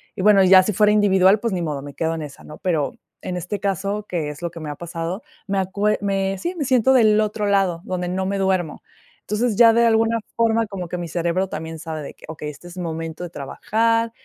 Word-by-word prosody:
Y, 205 - -4
bueno, 205 -1 +6
ya 185 0 +7
si 215 - -1
fuera 210 +2 +4
individual, 200 -1 +4
pues 230 -1 -2
ni 180 - -1
modo, 150 -4 -3
me 145 0 -9
quedo 160 +3 -1
en 160 - -5
esa, 145 -2 -10
¿no? 150 - -11
Pero, 160 -4 0 0.3
en 180 -1 -4
este 190 +4 -4
caso, 200 +2 -2
que 160 -4 -2
es 150 +1 -9
lo 170 - -2
que 165 - -9
me 155 -2 -6
ha - - -6
pasado, 170 +4 -5 0.3
me 195 -1 0
acue 200 +3 0
me 195 -1 0
sí, 350 - -3
me 305 -5 -2
siento 260 0 +4
del 215 -4 +5
otro 210 0 -1
lado, 195 -4 +1
donde 180 -4 -3
no 190 +1 -1
me 195 +1 -1
duermo. 185 -4 0 0.4
Entonces, 215 +2 -1
ya 230 +1 +7
de 235 +1 +4
alguna 225 0 +3 0.2
forma 230 0 +2
como 190 -4 -6
que 180 - -4
mi 175 -1 -4
cerebro 175 +3 -1
también 160 +1 -6
sabe 160 -1 -5
de - - -8
que, - - -15
okey, 150 -1 -6
este 150 +4 -11
es 175 +1 -12
momento 165 -1 -5
de 175 - -5
trabajar. 230 +10 0
190 Hz, 240 wpm, -22 LUFS, 165-210 Hz, 0.4 s, ya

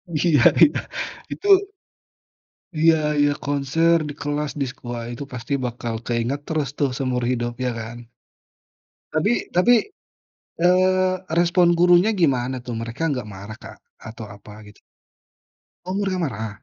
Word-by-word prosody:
Iya 160 +4 +1 0.3
iya. 295 - +6 0.5
Itu 405 - -5 1.3
Iya 165 0 +6 0.2
iya 145 0 +3
konser 145 +4 +2
di - - -5
kelas, 145 0 -2
di - - +2
sekolah 120 -2 -7
itu 130 - -6
pasti 125 +3 -4
bakal 120 -1 -4
keinget 120 +4 -1
terus 155 -4 -1
tuh 140 - +2
seumur 125 -2 -1
hidup 120 -1 -2
iya 125 - 0
kan? 115 +2 -7 1.2
Tapi 215 - +2 0.2
tapi, 210 +8 +5 0.8
eee, 185 +1 +3 0.3
respon 175 0 +4
gurunya 175 +4 +5
gimana 130 -6 0
tuh? 125 - -5
Mereka 130 +7 -2
nggak 125 -5 -4
marah 100 +2 -9
Kak? - - -11 0.2
Atau 110 0 -9
apa 105 +1 -12
gitu? 105 0 -16 1.1
Oh 185 - -4
mereka 195 -2 -1
marah 110 -6 -3
140 Hz, 135 wpm, -22 LUFS, 120-170 Hz, 1.3 s, iya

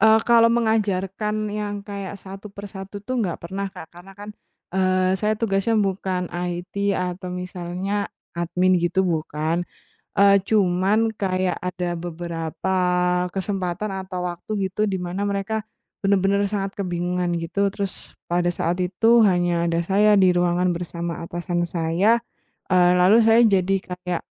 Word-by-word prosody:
Eee, 220 +1 +6
kalau 230 -1 +6
mengajarkan 210 -3 0 0.2
yang 205 -1 -4
kayak 200 -1 -6
satu-persatu 200 0 -9
tuh, 255 +3 -2
nggak 180 -6 -1
pernah, 195 +3 -4
Kak. 180 -4 -11
Karena 175 +3 -13
kan, 205 +1 -8 0.4
eee, 185 0 +2
saya 215 0 +1
tugasnya 215 0 +1
bukan 190 -3 -1
IT 180 +3 -2
atau 180 0 -3
misalnya 180 +2 -3 0.2
admin 180 +1 +1
gitu, 175 +3 +1
bukan. 160 -1 -1 0.6
Eee, 200 0 +6
cuman 200 +2 +2
kayak 185 -2 -1
ada 180 -1 -3
beberapa 170 +2 -3 0.6
kesempatan 195 0 -2
atau 180 -1 -4
waktu 190 +3 -3
gitu, 210 +2 0
dimana 185 0 -2
mereka 200 +2 -2 0.4
benar-benar 200 0 +2
sangat 195 -1 -2
kebingungan 175 -1 -1
gitu, 175 +4 0
terus 195 0 -6
pada 175 0 0
saat 175 0 -1
itu 225 +6 +4
hanya 175 -2 +1
ada 170 0 0
saya 205 +3 +4
di 185 -2 +5
ruangan 175 0 +2
bersama 170 0 -4
atasan 175 0 -2
saya, 175 +8 +2 0.5
eee, 180 -1 +5
lalu 185 +6 +6
saya 225 +1 +6
jadi 195 -3 +3
kayak, 180 -1 -4
185 Hz, 135 wpm, -23 LUFS, 175-200 Hz, 0.6 s, Eee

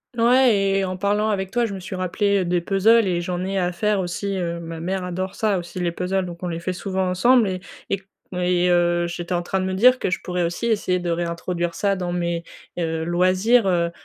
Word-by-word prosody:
Ouais 245 0 +5 0.2
et 195 - +1
en 185 0 -3
parlant 205 +3 +1
avec 190 -2 -2
toi, 240 +1 +1
je 215 - -4
me 195 - -5
suis 190 +1 -6
rappelé 190 +1 0
des 175 0 +1
puzzles 210 +5 +4
et 175 -2 0
j'en 180 +1 -3
ai 195 +1 -1
à 180 -1 0
faire 210 +2 +1
aussi, 190 +2 -3
heu, 170 -1 -2
ma 165 -1 -7
mère 185 +3 -2
adore 185 +1 -4
ça 210 -4 +1
aussi 175 +1 -7
les 175 -1 0
puzzles 185 +2 -1
donc 170 -1 -8
on - - -1
les 170 -1 -4
fait 185 - -2
souvent 190 0 -2
ensemble 235 +5 +4
et 185 -1 -3 0.3
et 195 - -1 0.3
et 180 0 +1
heu, 175 0 +2
j'étais 170 +1 -4
en 175 - +1
train 190 +2 -2
de 185 - -1
me 190 - -2
dire 250 +7 +5
que - - -1
je 185 - -1
pourrais 180 -1 -2
aussi 175 +7 -2
essayer 200 -5 +1
de 175 -1 -3
réintroduire 170 0 -2
ça 200 +2 0
dans 180 -2 -3
mes, 170 -1 -2 0.3
heu, 160 -2 -1
loisirs, 185 +6 +3
heu 170 -2 +1
185 Hz, 235 wpm, -22 LUFS, 175-195 Hz, 0.3 s, Ouais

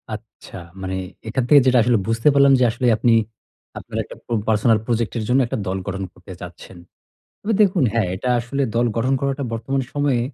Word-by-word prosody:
আচ্ছা, 105 -3 -12 0.2
মানে 95 0 -3 0.3
এখান 125 +3 -1
থেকে 145 - +8
যেটা 130 -1 +4
আসলে 120 -1 +3
বুঝতে 115 +4 0
পারলাম 140 -1 +5
যে - - +3
আসলে 120 +1 -1
আপনি, 115 +1 +3 0.6
আপনার - - -7
একটা - - -12
প্রব 115 -2 -1
পার্সোনাল 110 +1 +3
প্রজেক্ট 115 -2 -1
এর 110 - -2
জন্য 130 +2 +4
একটা - - -3
দল 95 +1 -1
গঠন 95 0 -3
করতে 90 +1 -14
চাচ্ছেন। 90 +1 -11 0.6
তবে 220 +2 -1
দেখুন 185 -6 +2
হ্যাঁ, 115 -3 +1
এটা 125 +7 -4
আসলে 135 +4 -3
দল 120 - +3
গঠন 130 +4 +1
করাটা 140 0 -2
বর্তমান 125 +4 -2
সময়ে 145 -4 +1
120 Hz, 190 wpm, -21 LUFS, 110-135 Hz, 0.6 s, থেকে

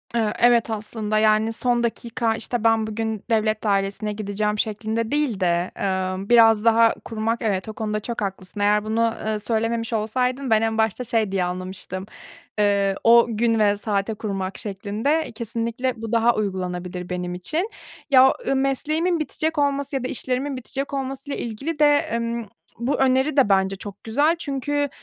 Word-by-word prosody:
Eee, 220 -3 +1
evet, 235 -1 +4
aslında. 215 0 -2
Yani 215 +1 +3
son 240 +1 +1
dakika, 235 -1 -1
işte, 240 0 -3
ben 225 -1 +3
bugün 220 -1 -3
devlet 215 -1 +1
dairesine 200 +1 0
gideceğim 210 0 -2
şeklinde 220 +2 -2
değil 290 -9 0
de, 175 -1 +1
eee, 190 0 -2
biraz 225 -2 +6
daha 230 0 +5
kurmak. 225 +1 -2
Evet 205 -1 -1
o - - -5
konuda 215 -1 -2
çok 230 +1 -5
haklısın, 195 0 -5
eğer 210 +1 +3
bunu, 225 +1 +1
eee, 215 -1 -1
söylememiş 230 +1 -1
olsaydın 250 +4 -1
ben 220 0 +4
en 225 0 0
başta 220 +2 +1
şey 225 -4 0
diye 190 -2 +1
anlamıştım, 185 +1 -5 0.5
eee, 200 -1 +2
o 235 +1 +7
gün 230 0 +1
ve 205 -1 +3
saate 205 0 -1
kurmak 195 -3 -4
şeklinde, 215 +10 -2
kesinlikle 235 +3 -2
bu 225 0 -5
daha 230 +1 +3
uygulanabilir 180 -3 -3
benim 180 0 -3
için. 315 - -2 0.4
Ya, 265 -1 +7
ııı, 275 - +2
mesleğimin 310 +6 0
bitecek 310 +1 -2
olması 280 -1 0
ya 265 - -1
da 255 - -1
işlerimin 260 +2 -2
bitecek 275 +3 -4
olmasıyla 275 +1 -4
ilgili 275 +8 -4
de, 290 -1 +4
ımm, 235 -1 -3 0.3
bu 250 +4 0
öneri 265 +2 +2
de 255 -7 +5
bence 190 0 +2
çok 200 0 -10
güzel 290 +9 +2
çünkü 290 -1 -1
225 Hz, 165 wpm, -23 LUFS, 205-250 Hz, 0.5 s, o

